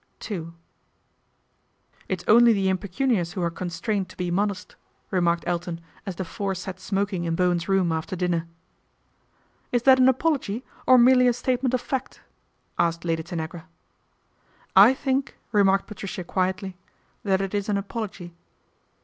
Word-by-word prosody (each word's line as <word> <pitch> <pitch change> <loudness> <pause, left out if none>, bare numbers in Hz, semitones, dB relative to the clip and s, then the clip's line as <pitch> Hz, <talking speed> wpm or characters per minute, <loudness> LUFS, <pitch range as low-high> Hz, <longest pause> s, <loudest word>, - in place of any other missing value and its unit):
II 165 -4 -4 0.9
' - - -37
It 185 -2 -2
is - - -25
only 235 +1 +7
the 195 -2 +1
impecunious 190 -1 0
who 185 - -3
are 170 - 0
constrained 185 +3 -3
to - - -15
be 180 -1 -2
modest," 200 +1 -2 0.4
remarked 170 -2 +1
Elton 175 -1 -2 0.3
as 190 - -4
the 185 - -4
four 195 +2 -3
sat 185 0 -6
smoking 195 -2 -2
in 165 -1 0
Bowen's 175 0 +1
room 190 -3 +2
after 160 +3 -3
dinner. 175 -2 -1 0.6
" - - -40
Is 245 -1 +1
that 260 0 +6
an 255 0 +6
apology, 260 -5 0 0.2
or 255 - +8
merely 250 +1 +6
a 245 - +4
statement 255 +1 0
of 250 - -2
fact? 265 -2 -4 0.3
" - - -35
asked 170 0 +1
Lady 165 -1 0
Tanagra. 165 0 -6 0.6
" - - -35
I 265 - +1
think," 270 0 -1
remarked 195 -2 +3
Patricia 195 -3 -6
quietly 185 +1 -2 0.2
" - - -40
that 190 -2 +2
it 195 0 -3
is 205 0 -2
an 205 - +2
apology." 200 -4 -5
190 Hz, 165 wpm, -25 LUFS, 175-225 Hz, 0.9 s, or